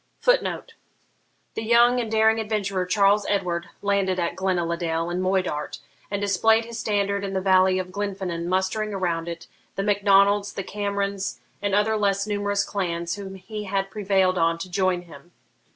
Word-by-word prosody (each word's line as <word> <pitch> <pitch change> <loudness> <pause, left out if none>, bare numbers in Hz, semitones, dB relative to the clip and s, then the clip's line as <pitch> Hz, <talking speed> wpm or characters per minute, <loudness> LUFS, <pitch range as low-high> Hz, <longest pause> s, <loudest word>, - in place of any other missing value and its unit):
[Footnote: - - +1 0.8
The - - -4
young 235 +2 +4
and 230 -2 -2
daring 220 0 +4
adventurer, 200 -4 -1
Charles 200 +2 +3
Edward, 180 -4 -1
landed 200 -2 +1
at 170 -1 -1
Glenaladale, 170 -2 -1
in 180 +1 -1
Moidart, 185 -5 -1 0.3
and 200 - -2
displayed 220 +3 +3
his 230 0 -7
standard 200 -2 0
in 195 -1 -4
the - - +2
valley 185 0 +4
of 185 -1 -4
Glenfinnan, 190 -4 -3
mustering 190 +3 -1
around 170 -3 -1
it 170 -1 -6 0.3
the 195 - -1
Mac 205 0 +1
Donalds, 200 +1 +4
the 195 - -4
Camerons, 200 -1 -3 0.2
and 200 -1 0
other 215 +1 +2
less 200 -1 +1
numerous 205 -1 0
clans, 170 -4 -2
whom 195 -1 -8
he 210 +3 -7
had 195 0 -2
prevailed 190 -3 +1
on 165 0 +2
to 180 +2 -7
join 185 -1 +1
him. 165 0 -15
195 Hz, 165 wpm, -24 LUFS, 185-205 Hz, 0.8 s, young